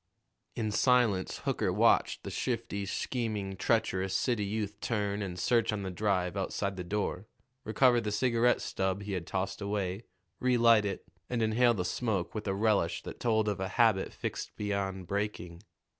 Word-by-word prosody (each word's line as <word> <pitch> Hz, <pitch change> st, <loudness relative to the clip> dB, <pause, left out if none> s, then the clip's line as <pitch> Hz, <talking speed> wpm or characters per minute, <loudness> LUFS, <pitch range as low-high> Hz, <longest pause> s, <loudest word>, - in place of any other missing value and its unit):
In 110 Hz, -2 st, -1 dB
silence 115 Hz, -5 st, +2 dB
Hooker -, -, 0 dB
watched -, -, +3 dB
the -, -, -5 dB
shifty, 100 Hz, -1 st, -2 dB
scheming, 105 Hz, -4 st, -2 dB
treacherous 95 Hz, -2 st, 0 dB
city 115 Hz, 0 st, +1 dB
youth 105 Hz, 0 st, -3 dB
turn 105 Hz, -2 st, -1 dB
and 90 Hz, -3 st, -4 dB
search 110 Hz, +4 st, +2 dB
on 105 Hz, -2 st, -3 dB
the 95 Hz, -, -3 dB
drive 90 Hz, -1 st, 0 dB
outside 100 Hz, 0 st, -2 dB
the 90 Hz, -, -5 dB
door, 100 Hz, +1 st, -2 dB, 0.4 s
recover 120 Hz, +2 st, +4 dB
the 105 Hz, -1 st, -3 dB
cigarette 120 Hz, +2 st, +2 dB
stub 95 Hz, +1 st, -2 dB
he 100 Hz, -, -5 dB
had 90 Hz, -3 st, -3 dB
tossed 95 Hz, +2 st, -3 dB
away, 100 Hz, 0 st, -2 dB, 0.3 s
relight 115 Hz, -4 st, +4 dB
it, 100 Hz, -, -4 dB, 0.2 s
and 120 Hz, -2 st, 0 dB
inhale 120 Hz, +2 st, +3 dB
the 90 Hz, -3 st, -2 dB
smoke 100 Hz, -2 st, -1 dB
with 105 Hz, -1 st, -5 dB
a 95 Hz, -, 0 dB
relish 105 Hz, -5 st, +1 dB
that -, -, -8 dB
told 110 Hz, -2 st, +2 dB
of 105 Hz, -2 st, -1 dB
a 95 Hz, -, -1 dB
habit 110 Hz, -5 st, +3 dB
fixed -, -, -5 dB
beyond 100 Hz, -2 st, -2 dB
breaking. 95 Hz, -3 st, -3 dB
105 Hz, 165 wpm, -30 LUFS, 95-110 Hz, 0.4 s, recover